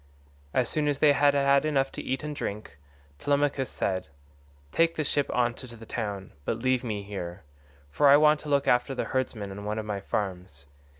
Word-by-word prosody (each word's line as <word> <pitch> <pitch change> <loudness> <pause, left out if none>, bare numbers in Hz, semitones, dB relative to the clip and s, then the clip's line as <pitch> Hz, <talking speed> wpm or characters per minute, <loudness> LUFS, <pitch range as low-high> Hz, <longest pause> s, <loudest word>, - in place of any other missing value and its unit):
As 125 +7 +1
soon 150 +3 -1
as 145 -2 +1
they 145 0 +5
had 145 0 +4
had 140 0 +4
enough 140 -3 +1
to - - -6
eat 130 +2 -3
and 150 -1 -4
drink 100 - -5 0.4
Telemachus 140 - +1
said, 95 -1 -2 0.6
"Take 165 0 +2
the 155 - -1
ship 145 -1 0
on 120 -1 +1
to 120 -1 -10
the 115 - -11
town, 100 -5 -4
but 110 - -1
leave 130 +1 +1
me 105 -4 -3
here, 95 -3 -6 0.5
for 145 - +3
I 140 - +9
want 150 0 +5
to 150 - -8
look 140 -1 +2
after 125 +2 +2
the - - -2
herdsmen 115 -6 -2
on 100 +1 -7
one 105 +1 -3
of 110 - -3
my 105 -2 -3
farms. 90 -7 -4
125 Hz, 200 wpm, -27 LUFS, 100-145 Hz, 0.6 s, I